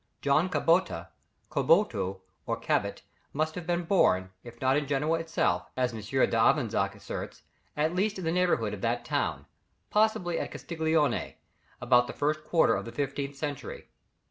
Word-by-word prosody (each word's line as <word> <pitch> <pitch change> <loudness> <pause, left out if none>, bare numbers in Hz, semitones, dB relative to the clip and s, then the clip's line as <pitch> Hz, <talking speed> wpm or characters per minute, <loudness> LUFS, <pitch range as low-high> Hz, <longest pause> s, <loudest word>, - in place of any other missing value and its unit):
John 150 +6 +3
Cabota, 165 - +1 0.4
Caboto 95 +1 +2 0.3
or - - -1
Cabot - - -1 0.3
must 155 +2 0
have 175 -1 -7
been 175 0 0
born, 95 - +2
if 120 -1 -12
not 130 +1 +2
in 145 -1 0
Genoa 150 +4 +1
itself, 165 0 0
as 125 -1 +1
M. 110 - -6
d'Avezac 115 -2 +2
asserts, 105 - -7 0.3
at 155 +3 +1
least 200 +3 0
in 185 - -5
the 160 - +1
neighbourhood 180 +1 +1
of - - -6
that - - -1
town, - - -1 0.5
possibly 210 -5 +2
at - - -3
Castiglione, 160 -2 0 0.4
about 125 0 +4
the - - -6
first 155 +1 -1
quarter 165 +1 +3
of - - -3
the 115 - -7
fifteenth 140 0 -3
century. 145 -1 -6
150 Hz, 155 wpm, -29 LUFS, 125-165 Hz, 0.5 s, about